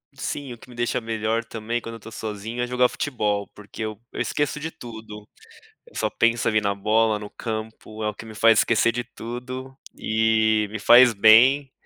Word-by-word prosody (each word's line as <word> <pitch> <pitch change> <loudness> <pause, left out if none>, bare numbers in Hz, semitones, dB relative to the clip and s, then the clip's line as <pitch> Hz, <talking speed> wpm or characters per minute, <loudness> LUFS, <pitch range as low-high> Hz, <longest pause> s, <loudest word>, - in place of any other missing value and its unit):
Sim, 135 -1 -5
o - - -12
que - - -17
me 125 - -14
deixa 120 +1 -1
melhor 115 0 -2
também, 115 +1 -4
quando 115 -1 -8
eu 115 - -11
tô 115 - -12
sozinho, 110 +2 -5
é - - -2
jogar 125 0 +2
futebol, 105 -7 -2
porque 105 +1 -9
eu 110 -1 -5
eu - - -7
esqueço 145 +5 -1
de 160 +2 -5
tudo. 110 -5 -11 0.7
Só - - 0
penso 115 0 +1
ali 110 -1 +2
na 100 -1 -1
bola, 110 +2 +1
no 105 - -8
campo. 110 0 -7
É 105 - 0
o 105 - -4
que 115 - -11
me 110 - -10
faz 115 0 +5
esquecer 115 0 +2
de 120 +1 -3
tudo 130 +3 -8 0.2
e 110 -1 +1
me 110 - -5
faz 120 +3 +7
bem. 125 +7 +5
115 Hz, 195 wpm, -23 LUFS, 110-120 Hz, 0.7 s, faz